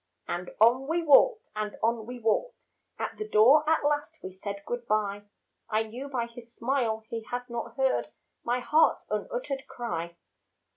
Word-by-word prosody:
And 175 +1 -3
on 245 +5 +5
we 335 +2 0
walked 430 - +5
and 210 -1 -3
on 225 -1 +1
we 250 0 -6
walked, 235 - -1 0.3
At - - -4
the 430 - -3
door 280 +8 +6
at 320 -2 +2
last 295 0 0
we 185 - -6
said 200 +1 -6
good 240 -1 -4
bye; 205 -1 0 0.4
I 215 +1 +2
knew 240 +5 -7
by 245 -4 -1
his 235 0 -13
smile 235 -3 0
he 230 - -3
had 245 0 -4
not 235 -1 -5
heard 265 -1 +1 0.3
My 245 +1 0
heart's 310 +5 +3
unuttered 280 - -3
cry. 170 -10 -4
240 Hz, 165 wpm, -28 LUFS, 215-275 Hz, 0.4 s, door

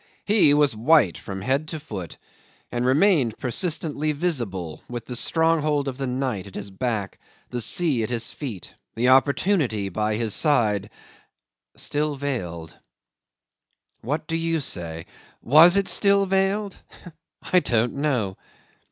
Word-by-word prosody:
He 200 -9 +4
was 145 -5 +3
white 115 - +3
from 95 -1 -7
head 135 +6 0
to 160 0 -5
foot, 100 - -8 0.5
and 120 +1 -1
remained 140 - +3
persistently 155 +2 -1
visible 115 - -3
with 120 -2 -6
the 125 - -6
stronghold 155 -1 +1
of 130 -1 -4
the 135 - -2
night 125 -6 -3
at 95 - -13
his 100 -1 -6
back, 105 -1 -3 0.3
the 120 -1 -2
sea 145 +1 +2
at 110 - -2
his 115 -2 -2
feet, 120 - -7 0.2
the 125 +2 +2
opportunity 135 - +2
by 105 +3 -1
his 110 -2 -2
side 105 - +1 0.9
still 150 0 -2
veiled. 90 - -5 1.3
What 150 +6 -3
do 165 - -3
you 165 0 0
say? 85 - -5 0.4
Was 165 +8 +7
it 200 - +1
still 200 -1 +4
veiled? 195 +1 0 0.8
I 180 - +7
don't 120 -6 0
know. 125 -10 -1
130 Hz, 135 wpm, -23 LUFS, 110-155 Hz, 1.3 s, Was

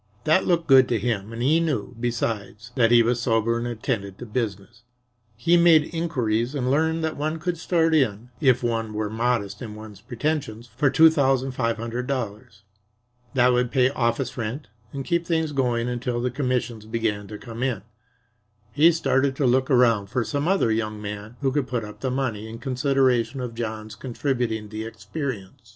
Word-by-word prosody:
That 160 +4 +3
looked 170 -2 +2
good 130 -3 +6
to 120 - +2
him, 110 -1 -2
and 115 +1 -4
he 155 +5 +4
knew, 130 -8 -2
besides, 115 -1 -3
that 115 -3 +3
he 120 0 +6
was 120 +1 0
sober 115 -1 +1
and 120 - -3
attended 110 -4 -3
to 125 - -8
business. 110 -1 -4 0.5
He 165 +10 +3
made 170 -2 +5
inquiries 125 -7 -1
and 130 -2 0
learned 160 +3 +1
that 160 -1 -2
one 155 +2 -2
could 175 +2 -2
start 165 -2 +2
in, 120 -5 +1
if 130 -4 +3
one 115 -2 -1
were 105 -1 -2
modest 110 -3 -1
in 110 -4 -7
one's 105 -2 -11
pretensions, 120 -1 -3
for 145 +2 +3
two 160 +3 +6
thousand 135 -3 +1
five 115 -3 -1
hundred 120 +2 -4
dollars. 110 -4 -5 0.7
That 125 -1 +5
would 125 0 +1
pay 130 0 +3
office 120 0 -1
rent 115 +2 -4 0.2
and 135 -1 -5
keep 170 -1 0
things 160 -2 0
going 125 -4 0
until 120 0 -2
the 125 +1 -1
commissions 125 -5 -2
began 110 -3 -2
to 105 - -7
come 115 +1 -8
in. 125 -7 -1 0.9
He 155 +9 +5
started 135 -4 +1
to 135 - 0
look 130 +1 +2
around 115 -6 +4
for 125 +4 -1
some 145 +5 -2
other 190 -11 +2
young 110 -1 -2
man 105 +2 -7
who 135 -2 +1
could 140 -1 -1
put 120 -4 -2
up 105 - -11
the 130 - -2
money 115 -5 -2
in 115 - -7
consideration 130 0 +1
of 125 -2 -4
John's 110 -2 -5
contributing 120 -3 -2
the 110 +1 -5
experience. 115 -3 -6
125 Hz, 185 wpm, -24 LUFS, 110-135 Hz, 0.9 s, good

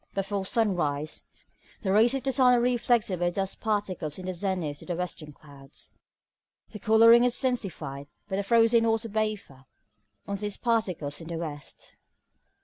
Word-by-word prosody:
Before 195 0 -2
sunrise, 170 - -1 0.5
the 190 - -1
rays 225 +6 +4
of 270 - -3
the 270 - 0
sun 250 -2 +5
are - - +3
reflected 235 -5 +1
by 175 0 +2
dust 195 +2 -4
particles 195 -8 -2
in 185 - -8
the 185 - -3
zenith 175 -5 -3
to - - -11
the 175 - -2
western 165 -3 -5
clouds. 140 -2 -14 0.8
The 210 - -9
colouring 230 +2 +6
is 245 -1 +1
intensified 185 - -3 0.2
by 190 - -3
the - - +1
frozen 230 +2 +4
water 225 0 0
vapour 210 -11 -3 0.6
on 200 0 -3
these 205 0 -4
particles 185 - -1
in 165 - -9
the 170 -1 -4
west. 150 -3 -8
195 Hz, 160 wpm, -27 LUFS, 165-230 Hz, 0.8 s, colouring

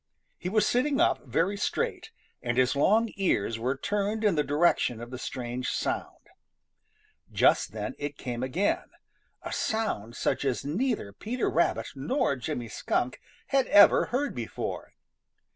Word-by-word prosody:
He 180 - -3
was 215 +2 +3
sitting 275 +3 +1
up 335 - +2
very 165 - +1
straight, 200 - -2 0.3
and 120 0 -2
his 130 +2 +3
long 215 +10 +3
ears 115 - 0
were 130 +4 -1
turned 205 +6 -1
in 210 -3 +4
the 150 -2 +1
direction 145 -5 +2
of 120 +1 -8
the 125 - -6
strange 125 -1 -4
sound. - - -3 1.1
Just - - +3
then - - -4
it 145 0 -4
came 120 -1 -4
again, 150 +11 0 0.5
a - - -5
sound 120 - -2
such - - 0
as 135 -2 -1
neither 180 - -1
Peter 235 - -2
Rabbit 170 - +1
nor 145 - 0
Jimmy 120 -1 -4
Skunk 120 +3 -2 0.3
had 270 -2 +2
ever 205 0 +7
heard 280 +4 -1
before. 120 -2 -5
150 Hz, 145 wpm, -28 LUFS, -, 1.1 s, ever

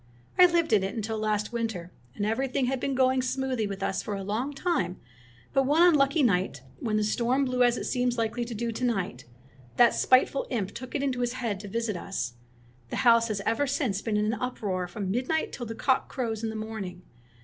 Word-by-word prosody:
I 360 - +10
lived 335 -7 +1
in 210 - +5
it 195 +4 -3
until 220 0 -3
last 215 0 -1
winter, 220 -7 -3 0.2
and 205 - -1
everything 255 +4 0
had 260 +1 -1
been 275 +1 -1
going 260 0 +3
smoothly 255 -3 -1
with 195 -1 -5
us 190 - 0
for 210 - -4
a 195 - -4
long 220 +8 -2
time, 275 - -1 0.5
but 270 -1 +3
one 310 +4 +5
unlucky 300 -3 +4
night, 180 - +1 0.2
when 215 -2 0
the 215 - +2
storm 245 +5 +1
blew 255 -1 0
as 245 -1 +4
it - - -3
seems 245 -1 0
likely 230 +1 -1
to 235 -1 -6
do 230 +2 -2
to 230 - -5
night, 195 - -1 0.5
that 240 -1 +6
spiteful 260 +1 +3
imp 205 -6 -2
took 255 +5 -8
it 280 - 0
into 260 -3 -1
his 245 0 0
head 230 -6 -2
to 205 - -8
visit 230 0 -2
us. 120 -8 -4 0.6
The - - -4
house 230 -1 +6
has 210 -3 -2
ever 230 +6 +1
since 255 -8 0
been 215 -1 -1
in 210 - +1
an - - -5
uproar 200 -7 -2
from 190 +1 -4
midnight 260 +8 0
till 240 -3 -5
the 225 - -5
cock 260 +3 +1
crows 230 -5 -3
in 225 - 0
the 220 - -5
morning. 215 -5 -6
230 Hz, 220 wpm, -28 LUFS, 210-260 Hz, 0.6 s, I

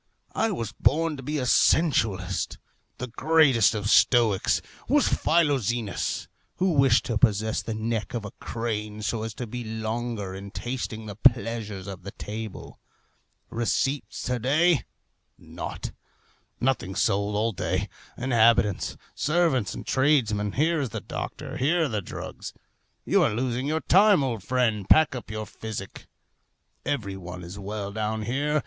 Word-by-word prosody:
I 225 - +1
was 115 - -3
born 160 +1 +1
to - - -7
be 150 +4 -3
a 130 - -1
sensualist. 115 - +2 0.4
The 125 - -4
greatest 135 -3 +4
of 105 -1 -2
stoics 110 -3 +4 0.3
was - - +4
Philoxenus, 120 - +1 0.3
who 185 0 +1
wished 135 -6 +4
to 115 -3 -1
possess 110 +1 +2
the 115 - -4
neck 110 -1 -2
of 115 -3 -3
a 105 - -6
crane, 105 -2 -4
so 110 +1 -1
as 110 -1 -5
to 125 - -4
be 120 +2 -6
longer 110 -2 -3
in 100 +1 -7
tasting 115 -1 -4
the 105 - -6
pleasures 115 -4 +1
of 95 -3 -7
the 100 - -7
table. 110 -1 -7 0.7
Receipts 135 +4 -1
to 125 -1 -1
day, 150 +5 +3 0.5
naught. - - -7 0.7
Nothing 120 -7 0
sold 100 +1 +1
all 110 +2 +1
day. 95 - -1 0.3
Inhabitants, 115 -5 +3 0.2
servants, 150 - +1
and - - -7
tradesmen, 115 -8 +2
here 160 +3 +2
is 135 - -2
the - - -4
doctor, - - -6
here 165 +6 +2
are - - +1
the 110 -5 -2
drugs. - - -7 0.5
You - - +3
are - - +2
losing 125 +2 -1
your 160 +1 0
time, 195 -3 +5
old 120 -5 -2
friend. 110 -3 0
Pack 155 -3 +6
up 125 - -7
your 110 0 -4
physic. 105 -2 -7 0.8
Every 110 -9 -2
one 90 -1 -8
is 90 +4 -8
well 100 0 -4
down 110 +1 -2
here. 145 +6 0
115 Hz, 150 wpm, -26 LUFS, 105-135 Hz, 0.8 s, Pack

